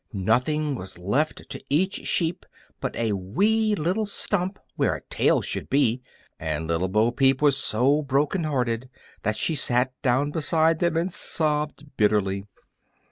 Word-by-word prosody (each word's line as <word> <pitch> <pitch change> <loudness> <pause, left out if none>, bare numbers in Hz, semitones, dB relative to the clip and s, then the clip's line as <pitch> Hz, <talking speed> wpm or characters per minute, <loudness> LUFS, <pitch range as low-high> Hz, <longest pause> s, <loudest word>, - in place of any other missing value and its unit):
Nothing 130 +10 +1
was 95 -9 -7
left 115 - -1
to - - -7
each 185 +7 0
sheep 165 0 0 0.3
but - - -4
a 115 -2 0
wee 205 - +1
little 190 +6 -1
stump 195 -1 -1 0.2
where - - +1
a - - -9
tail - - +3
should - - -3
be, 125 -3 +2 0.4
and 80 0 -3
Little 85 +3 0
Bo 110 +5 +2
Peep 135 +1 +3
was 145 -2 +4
so 130 +2 +2
heart 150 -2 -4
broken 145 +6 +1 0.8
that 105 +1 -1
she 160 - 0
sat 130 -3 +1
down 135 +2 +1
beside 160 +1 +2
them 170 -2 +1
and 170 +2 -1
sobbed 150 -2 -1
bitterly. 100 -2 +1
140 Hz, 150 wpm, -25 LUFS, 110-160 Hz, 0.8 s, was